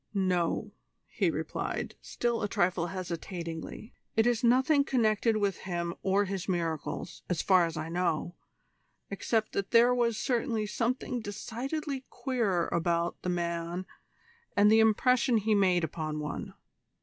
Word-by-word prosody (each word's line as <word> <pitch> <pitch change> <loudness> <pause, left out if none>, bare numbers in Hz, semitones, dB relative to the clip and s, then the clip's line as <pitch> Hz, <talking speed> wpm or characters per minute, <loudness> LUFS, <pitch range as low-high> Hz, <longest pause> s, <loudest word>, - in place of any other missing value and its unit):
"No," 180 -3 0 0.3
he - - 0
replied, - - -3
still 235 -1 -1
a 205 - 0
trifle 175 -3 +1
hesitatingly, 170 +1 -6 0.2
"it 225 0 +4
is 240 -1 +2
nothing 265 +5 +4
connected 225 -4 +2
with 200 -3 0
him 170 -2 -3
or 195 +1 +2
his 195 0 -4
miracles, 165 -4 -3
as 180 -3 0
far 185 -3 +5
as 165 -1 -6
I 155 +1 -3
know, 175 -1 -1 0.8
except 215 +2 0
that 200 -1 -2
there 240 +1 +6
was 235 -3 +1
certainly 235 -4 0
something 245 +3 -1
decidedly 260 +7 -4
queer 220 -10 0
about 170 0 0
the 180 - -2
man 170 +1 -2 0.7
and 205 +1 +6
the 220 - +6
impression 235 +3 +4
he 215 +1 +1
made 185 -4 +3
upon 155 -1 -3
one. 150 -1 -5
200 Hz, 135 wpm, -30 LUFS, 170-235 Hz, 0.8 s, there